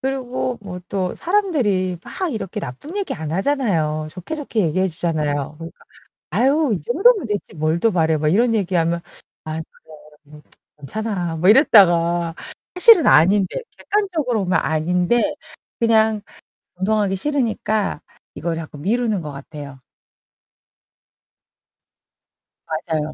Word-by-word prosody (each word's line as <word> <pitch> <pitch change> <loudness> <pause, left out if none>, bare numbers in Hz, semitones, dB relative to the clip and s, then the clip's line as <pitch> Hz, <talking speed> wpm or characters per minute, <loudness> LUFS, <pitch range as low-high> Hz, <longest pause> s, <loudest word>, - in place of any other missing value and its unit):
그리고 255 -2 -3
뭐 180 -3 -7
또 185 -2 -2
사람들이 250 - 0
막 370 -6 -4
이렇게 210 -1 -4
나쁜 285 - -7
얘기 400 - -2
안 155 -1 -6
하잖아요. 170 - 0
좋게 185 - -6
좋게 275 -7 -2
얘기해 185 +5 0
주잖아요. 155 -4 -2
그러니까 165 0 -11 0.5
"아유 275 +1 +2
이 - - -12
정도면 385 - +3
됐지 205 -2 -4
뭘 155 +2 0
더 225 +5 +2
바래." 160 -4 +2
막 150 - -1
이런 230 +7 +3
얘기하면 170 -4 0 0.5
아. 155 - -4
그래. 160 0 -8 0.5
음 150 +1 -15 0.4
괜찮아 180 +1 -3
뭐 175 +4 +2
이랬다가 175 - +5 0.4
사실은 365 -1 +7
아닌데 190 +4 +4 0.2
객관적으로 320 - -1
보면 185 0 +1
아닌데 180 - +1 0.5
그냥 220 -2 +3 0.6
운동하기 200 +1 0
싫으니까 220 -4 -1 0.3
이걸 170 -1 -3
자꾸 155 -2 -8
미루는 215 +4 0
거 150 -2 -6
같아요. 140 -1 -10 2.9
맞아요, 155 -1 -3
190 Hz, 280 characters per minute, -20 LUFS, 160-240 Hz, 2.9 s, 사실은